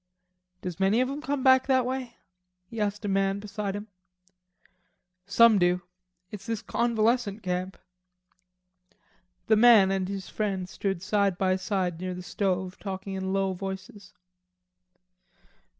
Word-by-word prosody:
"Does 180 -1 -5
many 195 +4 +3
of 255 - +2
'em 285 +2 -5
come 285 -3 -2
back 260 -1 +5
that 260 -2 +3
way?" 255 -2 -4 0.5
he 220 +4 -6
asked 205 +1 -2
a - - -1
man 195 0 +1
beside 205 -1 -4
him. 205 +1 -6 1.4
"Some 220 +1 +6
do. 180 0 +2 0.5
It's 200 -2 -9
this 225 -2 -3
convalescent 230 -2 0
camp." 185 +1 -3 1.7
The 220 - +4
man 215 -4 +7
and 190 -1 -1
his 195 -1 -5
friend 195 -4 -2
stood 195 -2 -3
side 200 -2 +1
by 185 0 +2
side 185 -3 -2
near 185 0 -4
the 180 - -7
stove 185 0 -2
talking 195 -1 -5
in 190 0 -3
low 195 -1 0
voices. 190 +1 -8
195 Hz, 135 wpm, -27 LUFS, 190-220 Hz, 1.7 s, man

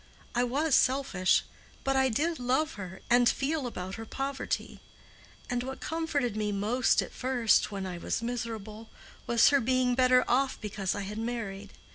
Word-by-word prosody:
I 245 - +2
was 280 +5 0
selfish, 255 -9 +3 0.4
but 270 0 +1
I 265 0 +3
did 315 +7 0
love 260 +6 +1
her, 190 -2 -8
and 245 0 +5
feel 280 -1 -1
about 190 -3 -6
her - - -7
poverty; 270 +3 -3 0.7
and 245 0 -1
what 265 +2 -6
comforted 305 -8 -1
me 210 -1 -1
most 215 +6 +2
at - - -9
first, 250 -5 +2
when 195 -1 -4
I 180 -2 -5
was 230 - -2
miserable, 225 -2 -5 0.4
was 235 -1 +5
her 280 -1 +3
being 255 +1 +2
better 255 0 +4
off 265 +2 +1
because 205 -3 -3
I - - -3
had 205 +2 -5
married. 215 -4 -5
245 Hz, 165 wpm, -29 LUFS, 210-265 Hz, 0.7 s, and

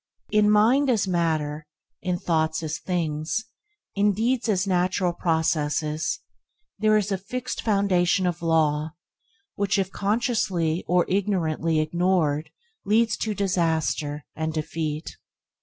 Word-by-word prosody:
In 210 -1 +4
mind 235 +7 +4
as 225 -5 +2
in 190 - -3
matter, 155 -3 -1 0.3
in 180 0 -1
thoughts 160 -2 0
as 155 0 -3
in - - -30
things, 170 +4 -1 0.5
in 205 +1 +2
deeds 235 +3 0
as 190 -2 +2
in 195 - -2
natural 180 0 +1
processes, 155 -2 0 0.6
there 215 0 +4
is 205 -1 -1
a 195 - 0
fixed 250 +6 -4
foundation 195 -3 +2
of 175 -1 -1
law 155 -2 +1 0.6
which, 200 0 0
if 195 -1 -1
consciously 200 -7 0
or 180 0 +3
ignorantly 170 -5 0
ignored 160 -2 +1 0.3
leads 220 +2 +2
to 215 -1 -2
disaster, 160 -6 0
and 160 0 -2
defeat. 155 0 -4
180 Hz, 130 wpm, -25 LUFS, 160-205 Hz, 0.6 s, In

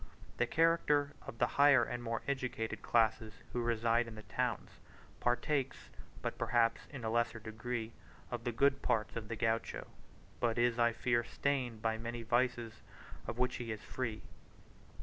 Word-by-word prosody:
The - - +2
character 150 -3 +3
of 115 - -7
the - - +4
higher 140 -3 +6
and 120 +1 -3
more 115 -1 -3
educated 125 -5 -2
classes 110 -1 +2 0.2
who 120 - 0
reside 115 0 +2
in 115 - -8
the 110 - -9
towns, - - -2 0.5
partakes, 135 +3 0 0.3
but - - -3
perhaps 115 -1 +2
in 135 -5 -8
a 110 - 0
lesser 115 0 +1
degree, 110 +1 -4 0.4
of 120 -1 -3
the 120 - 0
good 140 +3 +3
parts 105 -3 0
of 115 -2 -4
the 115 - -3
Gaucho, 115 0 -1 0.5
but 115 -1 +1
is, 120 0 +2
I 120 0 +5
fear, 120 0 +1
stained 125 -4 -1
by 110 -1 +1
many 115 +1 -4
vices 120 -1 0 0.5
of - - -4
which 125 0 +1
he 120 -2 -4
is 110 - -5
free. 115 -4 -4
120 Hz, 165 wpm, -35 LUFS, 115-125 Hz, 0.5 s, higher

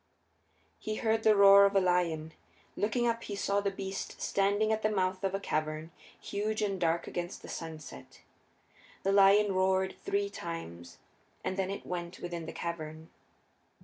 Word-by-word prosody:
He 215 - -3
heard 225 0 +1
the 215 -1 +5
roar 200 0 +8
of 200 - +2
the 195 - +5
lion. 170 -4 0 0.4
Looking 230 +4 0
up 230 -1 0
he 205 - -5
saw 200 0 0
the 200 - 0
beast 195 0 -6
standing 200 +2 +1
at 220 - -1
the 215 - +2
mouth 185 -2 -1
of 195 0 0
a - - -1
cavern, 155 -2 -3 0.3
huge 215 +2 -2
and 195 -3 -2
dark 170 0 +1
against 175 0 -5
the - - -9
sunset. 160 -4 -8 0.8
The 195 - +2
lion 200 +1 +6
roared 190 0 +2
three 400 0 -1
times, 85 - -7 0.5
and 185 - -2
then 190 -1 -1
it 200 - -5
went 175 -1 -5
within 170 -2 -5
the - - -4
cavern. 160 -1 -6
190 Hz, 165 wpm, -31 LUFS, 170-205 Hz, 0.8 s, roar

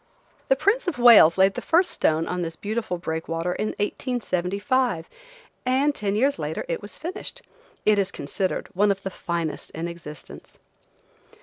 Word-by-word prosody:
The - - +6
Prince 455 +1 +1
of 335 - -1
Wales 230 -9 +8
laid 190 +1 +5
the - - -5
first 355 +3 +3
stone 160 +1 +1
of 180 +1 -3
this 165 -1 -4
beautiful 210 -1 -3
breakwater 165 +1 -3
in 210 - -2
1875, 205 - -1 0.6
and 265 +3 +2
ten 205 -5 -2
years 270 +6 +2
later 155 +1 -3
it 165 - -2
was 205 - -10
finished. 370 +9 -6 0.4
It 210 -1 +4
is 195 -1 +1
considered 185 +4 -3
one 205 +3 +3
of 195 -1 -1
the 195 - -4
finest 170 -3 -4
in 165 +2 -3
existence. 155 -4 -10
195 Hz, 160 wpm, -24 LUFS, 170-250 Hz, 0.6 s, Wales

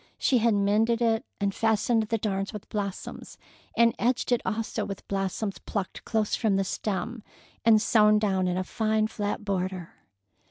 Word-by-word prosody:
She 255 - +3
had 230 -1 +3
mended 215 +3 +2
it, 230 +2 +1
and 200 -1 0
fastened 225 +2 +2
the 225 - 0
darns 195 -1 -2
with 210 - -8
blossoms, 200 -3 -5 0.4
and 235 -1 +5
edged 245 +1 0
it 245 - +3
also 225 0 -2
with 195 - -7
blossoms 195 +1 -2
plucked 200 -3 -5
close 220 -2 0
from 215 -4 +2
the 195 - +2
stem 210 +4 -3 0.4
and 225 -2 +6
sewed 215 -1 +4
down 190 -3 +1
in 180 0 0
a 185 - 0
fine 215 +2 0
flat 210 -1 -3
border. 185 -3 -2
210 Hz, 165 wpm, -27 LUFS, 195-225 Hz, 0.4 s, and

